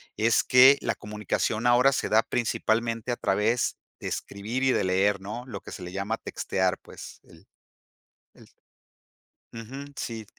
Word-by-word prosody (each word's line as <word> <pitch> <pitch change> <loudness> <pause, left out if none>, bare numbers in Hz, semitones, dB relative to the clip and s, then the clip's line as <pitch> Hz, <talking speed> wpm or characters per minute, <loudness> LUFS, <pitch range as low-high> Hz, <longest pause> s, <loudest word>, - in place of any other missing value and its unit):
es 115 +2 +3
que 130 +2 +7
la - - -1
comunicación 105 +2 -2
ahora 125 +3 +5
se 135 - -1
da 110 +1 +4
principalmente 115 0 -1
a 120 - -2
través 110 +5 0 0.2
de - - -6
escribir 110 +6 -4
y 130 - +4
de - - +1
leer, 95 +2 +2
¿no? 105 +5 -6
Lo 105 -7 -7
que - - -11
se 90 - -8
le 90 - -7
llama 100 +4 -2
textear, 95 -4 -1
pues, - - -12
el 85 +4 -19 0.9
el - - -18 1.1
Ujú, 125 +5 -8
sí. 115 -2 -5
110 Hz, 155 wpm, -26 LUFS, 100-120 Hz, 1.1 s, que